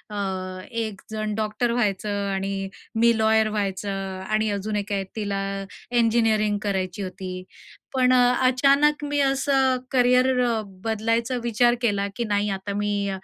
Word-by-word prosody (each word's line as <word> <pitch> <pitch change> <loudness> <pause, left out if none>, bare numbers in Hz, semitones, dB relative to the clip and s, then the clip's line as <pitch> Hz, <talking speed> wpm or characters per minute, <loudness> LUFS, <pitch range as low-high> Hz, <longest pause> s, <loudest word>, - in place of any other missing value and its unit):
अ, 185 -2 -3
एकजण 215 -1 -4
डॉक्टर 215 +2 -1
व्हायचं 210 -4 0 0.2
आणि 195 0 -3 0.3
मी 230 0 +4
लॉयर 220 0 +3
व्हायचं. 200 -1 -2 0.4
आणि 215 0 +1
अजून 205 +1 -3
एक 205 0 -3
आहे, 195 - 0
तिला 200 -2 -2 0.5
इंजिनिअरिंग 225 -3 +2
करायची 190 -2 -2
होती. 185 -1 -6 0.5
पण 255 -1 +3
अ, 250 -1 +5
अचानक 280 +3 +3
मी 290 0 -1
असं 270 -1 +2
करियर 250 0 +4 0.2
अ, 230 -2 0 0.2
बदलायचा 230 +3 0
विचार 240 +1 +3
केला, 205 -4 +1
की 235 - -2
नाही, 205 -1 0
आता 195 +1 -3
मी 205 -1 -1
215 Hz, 135 wpm, -24 LUFS, 200-240 Hz, 0.5 s, अ